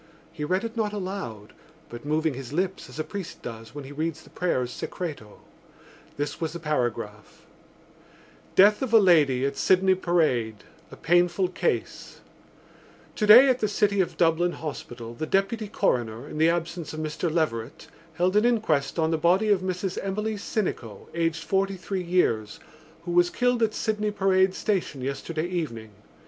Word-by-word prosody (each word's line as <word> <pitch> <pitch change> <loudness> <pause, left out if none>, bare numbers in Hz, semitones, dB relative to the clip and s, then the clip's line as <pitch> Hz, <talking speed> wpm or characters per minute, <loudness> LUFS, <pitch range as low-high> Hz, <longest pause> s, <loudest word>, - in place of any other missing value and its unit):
He 150 - -6
read 185 +7 0
it 230 0 -5
not 215 -2 -1
aloud, 185 - -6 0.3
but 120 +3 -10
moving 155 0 +1
his 130 -1 -8
lips 185 +4 -2
as - - -11
a 155 - -1
priest 195 +1 -7
does 115 0 -8
when 145 - -6
he 135 - -10
reads 160 +1 -3
the - - -18
prayers 130 -9 -1
Secreto. 145 - -6 0.8
This 145 +2 -3
was 160 -1 -2
the 170 - -6
paragraph: 120 -8 -3 1.1
DEATH 205 +2 +6
OF 255 -4 -2
A - - +9
LADY 150 - +4
AT 140 0 -1
SYDNEY 190 0 +4
PARADE 140 - 0 0.3
A - - -9
PAINFUL 175 +2 +2
CASE 315 - -3 0.9
Today 220 +5 +8
at 255 -1 +2
the 215 - +1
City 205 -1 +2
of 180 - -3
Dublin 170 +1 +2
Hospital 120 -6 -7
the 155 +7 -5
Deputy 195 +4 0
Coroner 120 - -1
(in 150 - -6
the 160 +1 +5
absence 170 -1 -3
of 155 - -6
Mr 155 +2 -2
Leverett) 140 -4 -2 0.3
held 180 +3 +1
an 210 - +5
inquest 210 - +1
on 160 -1 +1
the 160 - 0
body 185 +7 +3
of 200 -3 +3
Mrs 185 0 -3
Emily 210 +3 -2
Sinico, 200 - -4
aged 165 0 -1
forty 195 0 0
three 185 +1 -3
years, 145 -13 0 0.4
who 175 - -4
was 175 0 +4
killed 245 +2 +1
at 220 -1 +1
Sydney 210 -1 -1
Parade 190 -2 +2
Station 185 -9 -2
yesterday 155 +5 -3
evening. 150 -12 -4
170 Hz, 165 wpm, -26 LUFS, 145-195 Hz, 1.1 s, A